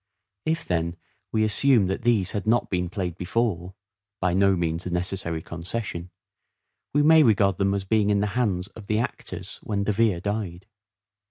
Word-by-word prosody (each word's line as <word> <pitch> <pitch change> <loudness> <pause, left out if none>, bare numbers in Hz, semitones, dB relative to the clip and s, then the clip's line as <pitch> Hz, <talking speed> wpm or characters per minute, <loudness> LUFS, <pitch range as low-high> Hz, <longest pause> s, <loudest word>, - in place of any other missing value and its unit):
If, 160 +1 0
then, 85 -1 -1 0.3
we 110 -1 +2
assume 110 +1 +4
that 95 +6 -2
these 110 -6 +2
had 105 +1 -4
not 120 +2 +2
been 90 -2 0
played 90 -3 -3
before 95 -2 -1 0.4
(by 90 -1 +1
no 100 +1 +4
means 85 0 -2
a - - -2
necessary 90 -2 -2
concession) 85 0 -5 0.8
we 145 +1 +3
may 160 +1 +7
regard 100 - +3
them 100 0 +2
as 95 -1 -3
being 105 0 +2
in 100 -1 +3
the 105 - +1
hands 100 -7 0
of 110 -3 -13
the 110 - +1
actors 115 - -4
when 100 -2 -2
De 105 - +1
Vere 105 -4 +2
died. 95 -3 -4
100 Hz, 175 wpm, -25 LUFS, 90-110 Hz, 0.8 s, may